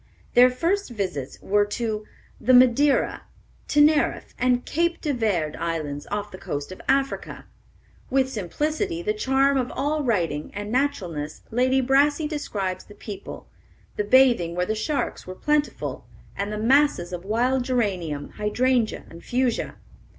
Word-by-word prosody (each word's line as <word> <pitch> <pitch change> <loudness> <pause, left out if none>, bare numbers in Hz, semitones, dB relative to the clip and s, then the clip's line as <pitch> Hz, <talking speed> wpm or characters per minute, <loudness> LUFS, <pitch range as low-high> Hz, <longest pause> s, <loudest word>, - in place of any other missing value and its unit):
Their 250 +1 +7
first 335 +10 -1
visits 185 - -4
were 205 +1 +3
to 215 0 -3 0.3
the 255 +1 +4
Madeira, 255 +3 +4 0.5
Teneriffe, 295 0 +3
and 250 -1 +2
Cape 340 +2 0
de 295 -3 -1
Verde 195 - 0
Islands, 150 -4 -3
off 205 0 -3
the 185 - -9
coast 145 +4 -5
of 185 - -9
Africa. 275 0 0 0.6
With 265 0 +2
simplicity, 305 - -2
the 425 - 0
charm 275 -7 +2
of 250 - -2
all 295 +3 -1
writing, 170 - -1
and 205 +1 -5
naturalness, 180 - -2
Lady 255 +3 +2
Brassey 290 +4 +3
describes 200 - -3
the 205 - -14
people, 200 -2 -8 0.5
the 210 - 0
bathing 230 -7 +4
where 180 0 0
the 215 - -1
sharks 245 +3 -2
were 185 - -6
plentiful, 300 +6 -1 0.3
and 200 +1 -3
the 210 - -3
masses 250 -5 +2
of 175 0 -5
wild 245 +6 +1
geranium, 185 - -1
hydrangea, 240 +2 +1
and 165 +1 -13
fuchsia. 250 -1 -1
240 Hz, 145 wpm, -24 LUFS, 195-275 Hz, 0.6 s, Their